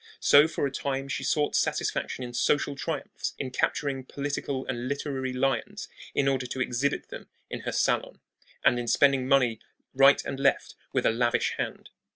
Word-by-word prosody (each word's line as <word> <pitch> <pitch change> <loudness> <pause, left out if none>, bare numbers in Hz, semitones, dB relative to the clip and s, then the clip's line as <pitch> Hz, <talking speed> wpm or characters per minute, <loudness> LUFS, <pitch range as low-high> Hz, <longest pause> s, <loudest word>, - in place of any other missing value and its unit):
So 145 +2 +6
for 155 -2 -2
a 140 - -2
time 135 0 -3
she 135 - -3
sought 145 +2 +1
satisfaction 130 - -1
in 120 -1 -7
social 145 +3 +1
triumphs, 145 +1 -4
in 130 -2 -4
capturing 135 +1 -1
political 140 0 -4
and 125 -1 -3
literary 135 -1 -3
lions 135 +2 -1 0.3
in 140 - +2
order 130 -2 0
to 130 - -5
exhibit 130 +2 -1
them - - -9 0.2
in - - -4
her - - -4
salon, - - 0 0.5
and 120 - +4
in 120 - -4
spending 135 0 +3
money 125 -5 +3 0.3
right 135 +1 +5
and 135 - -4
left 135 0 +1 0.2
with - - 0
a - - +5
lavish 120 +1 +1
hand. - - -5
135 Hz, 175 wpm, -27 LUFS, 125-140 Hz, 0.5 s, So